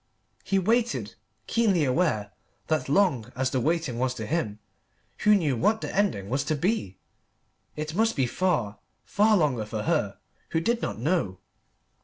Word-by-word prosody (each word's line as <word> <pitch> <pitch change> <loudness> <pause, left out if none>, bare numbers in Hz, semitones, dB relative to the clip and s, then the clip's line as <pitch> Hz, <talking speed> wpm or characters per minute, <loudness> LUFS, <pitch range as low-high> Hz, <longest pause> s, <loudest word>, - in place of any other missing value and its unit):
He 195 - 0
waited, 230 +5 +1 0.3
keenly 205 -8 +2
aware 130 - +1 0.4
that 155 -5 0
long 140 - +2
as 130 0 0
the 130 - +1
waiting 155 -5 0
was 130 0 0
to - - -5
him, 120 -11 -2 0.6
who 210 0 +5
knew 155 -9 +1
what 215 - +1
the - - -5
ending 195 - +1
was 135 +5 0
to 155 - 0
be, 150 - -1 0.8
it 155 +1 -4
must 225 +4 +2
be 135 - +2
far, 120 - -1 0.3
far 210 +1 +3
longer 140 - +1
for 110 -1 -4
her, 150 -12 0 0.3
who 165 - +1
did 235 +8 0
not - - -3
know. 125 - 0
155 Hz, 160 wpm, -26 LUFS, 120-195 Hz, 0.8 s, who